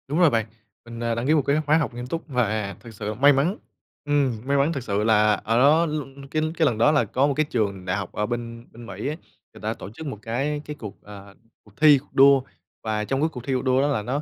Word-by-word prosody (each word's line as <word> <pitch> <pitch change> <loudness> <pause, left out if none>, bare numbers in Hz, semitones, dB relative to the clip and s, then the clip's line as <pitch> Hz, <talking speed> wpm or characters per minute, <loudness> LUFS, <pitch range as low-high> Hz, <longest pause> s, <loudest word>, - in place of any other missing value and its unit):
Đúng 150 +5 -1
rồi 175 -3 +6
bạn, 115 -4 0 0.4
mình, 115 -1 -9
à, 115 -1 0
đăng 120 +3 -2
ký 155 - +4
một 155 - +4
cái 145 +3 +2
khóa 150 +2 +4
học 150 -5 -1
nghiêm 120 +1 -6
túc 165 +5 -5
và 110 - -1
thực 115 -1 -12
sự 105 +1 -4
may 140 +6 +5
mắn. 155 +10 +1 0.5
Ừm, 140 -6 +1
may 140 +1 +1
mắn 140 +4 +2
thực 135 -5 -4
sự 105 -2 -1
là 105 -1 +4
ở 110 +3 -1
đó 150 +6 +5
l 155 -1 -2 0.3
cái 155 - 0 0.2
cái 160 - +3
lần 125 -7 +1
đó 120 +7 +4
là 150 -5 +3
có 130 +7 +1
một 145 - 0
cái 155 - +2
trường 100 -5 -2
đại 90 +1 -1
học 100 -3 -5
ở 105 - -1
bên 115 0 -5
bên 120 +1 -12
Mỹ 120 - -6
á, 150 - -2 0.4
người - - -14
ta - - -2
tổ 95 - -9
chức 120 +10 -10
một 120 -7 -6
cái 140 +7 -2
cái 150 - -6
cuộc, 105 -2 -9
à, 100 -1 -12 0.3
cuộc 105 - -21
thi, 150 -2 +7
cuộc 135 - -13
đua, 135 0 +6 0.4
và 110 -1 -1
trong 135 +4 -1
cái 160 - +2
cuộc 125 - -8
thi, 135 - -2
cuộc 130 - 0
đua 130 0 +2
đó 140 - +2
là 140 -7 0
nó 130 +7 -2
125 Hz, 280 wpm, -24 LUFS, 110-145 Hz, 0.5 s, thi